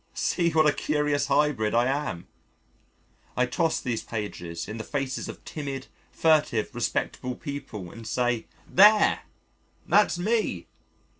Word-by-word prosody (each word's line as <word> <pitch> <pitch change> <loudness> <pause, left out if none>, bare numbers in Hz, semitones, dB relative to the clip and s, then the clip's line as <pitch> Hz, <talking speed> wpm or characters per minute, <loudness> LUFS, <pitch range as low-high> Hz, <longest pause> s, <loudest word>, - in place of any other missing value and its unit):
See 170 -2 +1
what 160 -1 +3
a 150 - +4
curious 150 -2 0
hybrid 140 -7 +2
I 120 +1 +4
am! 135 -10 -2 1.1
I 125 - +4
toss 160 +6 0
these 120 -4 -2
pages 90 -7 -5
in 110 +2 -6
the 110 - -5
faces 135 -1 -3
of - - -10
timid, 140 -3 -5 0.3
furtive, 155 -9 +2
respectable 125 +1 -2
people 120 - -7
and 115 -1 -10
say: 120 -2 0 0.2
"There! 210 +3 +6 0.7
that's 210 -4 +3
me! 205 - 0
135 Hz, 130 wpm, -26 LUFS, 115-155 Hz, 1.1 s, There